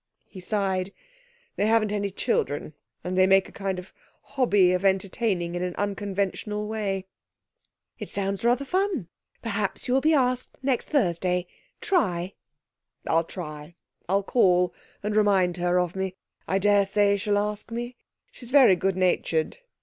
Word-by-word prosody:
He 190 - -11
sighed. 190 -1 -1 0.7
'They 205 - +2
haven't 220 -2 +3
any 200 -1 -1
children, 155 - -1 0.3
and 180 +1 -3
they 185 0 +5
make 195 0 +4
a - - -14
kind 195 -2 -3
of 180 +1 -9 0.3
hobby 205 -9 +3
of 180 +1 -1
entertaining 190 -2 0
in 175 - -3
an 180 -1 -3
unconventional 205 +1 -2
way.' 200 -3 -2 0.9
'It - - -6
sounds 195 0 -2
rather 245 +4 +2
fun. 365 - -1 0.3
Perhaps 210 0 -2
you 250 - +1
will 265 - +3
be 315 +2 +4
asked 255 -2 0
next 260 -2 0
Thursday. 180 - +1 0.4
Try.' 190 - 0 0.7
'I'll 165 +1 +2
try. 155 -2 -8 0.3
I'll 195 +1 +2
call, 180 -5 +3 0.3
and 210 0 -2
remind 195 -4 +3
her 175 0 +2
of 180 0 -1
me. 190 -1 -3 0.3
I 190 - +1
daresay 200 0 +3
she'll 205 +1 0
ask 210 +1 -2
me. 240 +2 -5 0.4
She's 245 - -12
very 260 -8 +7
good 190 +1 -1
natured. 175 - 0
195 Hz, 150 wpm, -26 LUFS, 180-215 Hz, 0.9 s, very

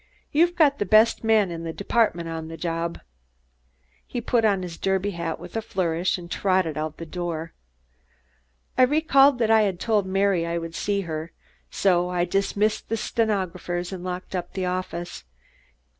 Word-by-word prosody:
You've 345 +4 +3
got 290 -4 +4
the 205 - 0
best 215 +4 +5
man 220 -4 +3
in 165 -1 -5
the 165 - -3
department 200 -4 +1
on 160 -1 -5
the 165 0 -8
job." 165 +1 -3 1.1
He 245 - -3
put 235 0 +1
on 200 -4 +2
his 170 -2 -7
derby 195 +1 0
hat 170 -3 -4
with - - -11
a 225 - 0
flourish 180 -4 -1
and 175 -1 -10
trotted 185 -5 +1
out 155 0 -4
the 165 - -7
door. 165 -1 -4 1.3
I - - +7
recalled 275 -1 +5
that 225 -2 +2
I 220 -1 +6
had 195 -4 0
told 210 -4 +1
Mary 195 -2 +2
I 170 0 -2
would 165 -1 -5
see 200 +3 -1
her, 160 -2 -5 0.4
so 180 - +2
I 175 -1 0
dismissed 200 +3 0
the 225 - 0
stenographers 185 -5 -2
and 180 -2 -6
locked 185 +1 -5
up 175 -1 -4
the 190 -1 -2
office. 180 - -4
185 Hz, 175 wpm, -24 LUFS, 170-215 Hz, 1.3 s, I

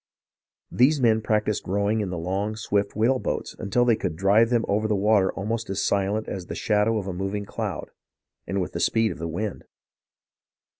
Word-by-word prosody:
These 140 +5 +4
men 110 -3 +3
practised 105 -1 0
rowing 100 +3 +1
in 100 - -3
the 90 - -4
long, 95 +5 -2
swift 100 -2 -1
whale 120 +5 +2
boats - - -3
until 120 +5 +1
they 120 -2 +4
could 80 - -3
drive 100 +6 +4
them 120 -2 +1
over 105 +2 +1
the 105 - +1
water 100 -1 +3
almost 110 +2 -3
as 100 0 -1
silent 100 +2 0
as 90 -3 -5
the - - -5
shadow 105 +1 +1
of 100 - -3
a 95 - -4
moving 95 +3 -3
cloud, - - -5 0.6
and 95 - -1
with 90 - -2
the - - -4
speed 115 -2 +2
of 85 - -8
the 85 - -3
wind. 90 +5 -4
105 Hz, 195 wpm, -25 LUFS, 95-110 Hz, 0.6 s, These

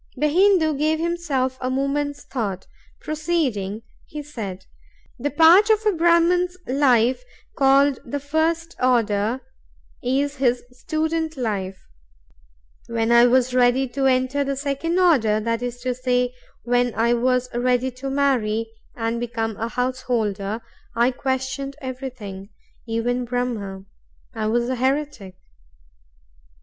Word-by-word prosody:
The 300 +3 +1
Hindoo 355 -2 +4
gave 310 +1 +2
himself 315 -6 -1
a 255 - -1
moment's 285 +2 -1
thought; 200 -7 -4 0.4
proceeding, 275 - -2 0.2
he 300 0 -7
said: 200 -10 -7 0.5
"The 285 +4 -1
part 335 +8 +6
of 435 0 +3
a 425 - +4
Brahman's 345 +1 +3
life 255 - +2 0.3
called 275 0 +4
the 285 +4 -4
first 320 +3 -1
order 230 -1 +1 0.6
is 280 +3 0
his 245 -2 +1
student 315 +4 -2
life. 195 -6 -3 1.1
When 230 0 0
I 235 +1 +7
was 250 0 +2
ready 250 +1 +3
to 270 +2 0
enter 260 +2 +1
the 275 0 -2
second 285 +5 -2
order—that 230 -10 +2
is 245 0 -4
to 255 0 -1
say, 250 0 0 0.3
when 245 0 +1
I 235 +1 +2
was 250 +1 +1
ready 250 +1 +1
to 260 +2 -6
marry 230 -6 0 0.2
and 230 0 -2
become 225 -2 -3
a 225 - -2
householder—I 235 -1 -2
questioned 260 +1 -3
everything, 250 -8 -7 0.4
even 240 +2 -1
Brahm; 230 -6 -3 0.5
I 220 -2 -2
was 235 +2 +1
a 255 0 -2
heretic. 260 -7 -2
255 Hz, 120 wpm, -22 LUFS, 235-285 Hz, 1.1 s, I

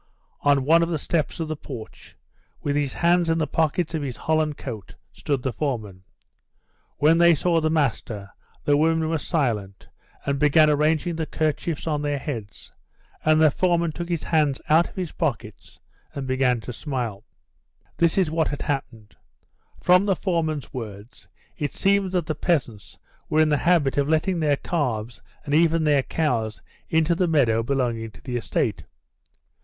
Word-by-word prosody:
On 140 -2 +3
one 165 +3 +5
of 170 - 0
the 165 - 0
steps 155 +2 -2
of 165 - -2
the 155 - -3
porch, 125 -6 -10 0.5
with 145 -1 0
his 145 -2 0
hands 170 0 +2
in 165 - +2
the 160 - +1
pockets 160 +2 0
of 160 - -1
his 130 -4 -4
holland 155 -2 0
coat, 110 -7 -8 0.2
stood 140 -4 -2
the 130 - -1
foreman. 110 -9 -3 1.0
When 160 +3 +4
they 170 -1 +6
saw 165 +2 +1
the 155 - +1
master, 115 -9 -1 0.3
the 145 - +4
women 160 +1 +2
were 160 -1 0
silent, 110 - -2 0.4
and 140 0 -1
began 150 +1 +5
arranging 155 +3 +1
the 160 -1 -2
kerchiefs 155 +1 -2
on 150 -3 -1
their 145 -1 -1
heads, 120 -8 -7 0.5
and 155 0 +4
the 155 -2 +5
foreman 170 0 +1
took 170 +2 -6
his 170 -3 -2
hands 150 -4 +1
out 160 +3 +4
of - - -18
his 180 -4 -4
pockets 120 - -4 0.4
and 140 - -4
began 130 -2 +1
to 125 - -7
smile. 120 -6 -4 0.7
This 170 +1 +2
is 180 -5 +2
what 160 0 +1
had 145 - -4
happened. 115 -7 -4 0.7
From 180 +3 +5
the 195 - +3
foreman's 160 -6 -2
words, 110 -2 -8 0.3
it 145 -3 -2
seemed 195 -1 +2
that 180 -3 0
the 155 - -2
peasants 140 - -2 0.3
were 155 - +2
in 155 -1 +4
the 150 - +3
habit 155 -4 +2
of 140 +1 0
letting 165 +3 +1
their 150 -3 +2
calves 125 -10 -3 0.2
and 145 - -3
even 165 +1 +3
their 145 -2 +3
cows 115 - -2 0.3
into 160 +1 +2
the 175 +1 +1
meadow 125 -9 +3
belonging 120 -3 -1
to - - -17
the 125 -2 -4
estate. 105 -6 -2
150 Hz, 170 wpm, -24 LUFS, 130-165 Hz, 1.0 s, they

